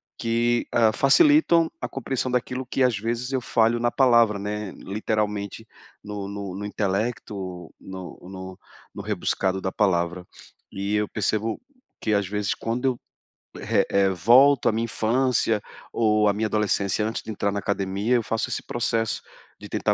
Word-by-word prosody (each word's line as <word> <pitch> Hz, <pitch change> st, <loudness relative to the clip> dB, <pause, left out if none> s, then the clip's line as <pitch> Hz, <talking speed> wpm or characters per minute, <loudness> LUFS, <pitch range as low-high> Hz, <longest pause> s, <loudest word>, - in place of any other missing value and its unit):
que, 120 Hz, +1 st, 0 dB
hã, 115 Hz, -2 st, +4 dB
facilitam 170 Hz, -, +5 dB
a -, -, -3 dB
compreensão 130 Hz, -1 st, -2 dB
daquilo 125 Hz, +1 st, -2 dB
que 135 Hz, -, +1 dB
às 125 Hz, -2 st, +3 dB
vezes 120 Hz, +3 st, -3 dB
eu 130 Hz, -, 0 dB
falho 115 Hz, 0 st, +2 dB
na 120 Hz, -, +2 dB
palavra, 115 Hz, -5 st, +4 dB
né, 105 Hz, 0 st, -4 dB
literalmente 105 Hz, 0 st, -3 dB, 0.4 s
no 105 Hz, -1 st, -5 dB
no 100 Hz, -2 st, -6 dB
no 105 Hz, -, -5 dB
intelecto, 100 Hz, -3 st, -3 dB
no 95 Hz, -1 st, -9 dB
no 95 Hz, 0 st, -9 dB, 0.3 s
no -, -, -6 dB
rebuscado 95 Hz, -1 st, -1 dB
da 95 Hz, 0 st, -3 dB
palavra. 90 Hz, -3 st, 0 dB, 0.5 s
E 100 Hz, +1 st, -3 dB
eu 105 Hz, 0 st, 0 dB
percebo 110 Hz, +1 st, -1 dB, 0.4 s
que, 110 Hz, -, 0 dB
às 100 Hz, -2 st, +1 dB
vezes, 105 Hz, 0 st, -1 dB
quando 115 Hz, +3 st, -3 dB
eu, 130 Hz, -2 st, +1 dB, 0.6 s
eh -, -, +2 dB
eh, 100 Hz, -1 st, +3 dB
volto 120 Hz, +9 st, +5 dB
à -, -, +5 dB
minha 115 Hz, +1 st, -1 dB
infância, 115 Hz, -1 st, +1 dB, 0.3 s
ou 105 Hz, -2 st, +2 dB
à 100 Hz, -, +3 dB
minha 110 Hz, +2 st, -1 dB
adolescência, 105 Hz, -1 st, 0 dB
antes 110 Hz, -, -3 dB
de -, -, -11 dB
entrar 100 Hz, -1 st, -1 dB
na 100 Hz, -, -2 dB
academia, 100 Hz, +3 st, 0 dB
eu 120 Hz, -, +2 dB
faço 115 Hz, +1 st, -1 dB
esse -, -, -3 dB
processo 115 Hz, -2 st, -1 dB, 0.4 s
de -, -, -10 dB
tentar -, -, +1 dB
105 Hz, 165 wpm, -24 LUFS, 100-120 Hz, 0.6 s, facilitam